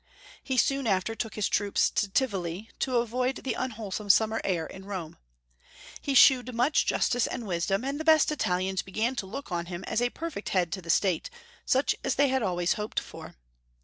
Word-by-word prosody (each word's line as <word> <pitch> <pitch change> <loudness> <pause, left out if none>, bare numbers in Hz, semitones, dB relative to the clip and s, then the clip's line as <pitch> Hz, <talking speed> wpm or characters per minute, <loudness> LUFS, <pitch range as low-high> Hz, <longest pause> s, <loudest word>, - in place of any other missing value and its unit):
He 265 -1 -2
soon 275 +1 +2
after 195 +2 +1
took 225 -1 -5
his 210 - 0
troops 205 -1 +2
to 205 - 0
Tivoli, 195 -4 -2
to 255 -2 +1
avoid 250 +3 0
the 265 - -2
un 255 - -2
wholesome 210 -2 -6
simimer 220 +3 +4
air 170 -4 0
in 190 +4 -10
Rome. 185 -6 -6 0.8
He 280 - -1
shewed 255 -2 +6
much 250 +6 +2
justice 245 -1 +1
and 245 -3 -5
wisdom, 195 +4 -1
and 280 +2 -2
the - - -3
best 315 -2 +5
Italians 185 -8 0
began 220 +6 -2
to 195 - -3
look 275 +3 -7
on 170 -1 -2
him 175 +1 -6
as 225 - -1
a 245 - +2
perfect 310 -7 -6
head 180 -3 +1
to 190 - -4
the 170 - -12
State, 180 0 +1 0.4
such 265 +2 +3
as 270 - 0
they 280 0 +3
had 265 0 +1
always 175 -4 +1
hoped 210 0 -2
for. - - -11
215 Hz, 200 wpm, -28 LUFS, 190-255 Hz, 0.8 s, shewed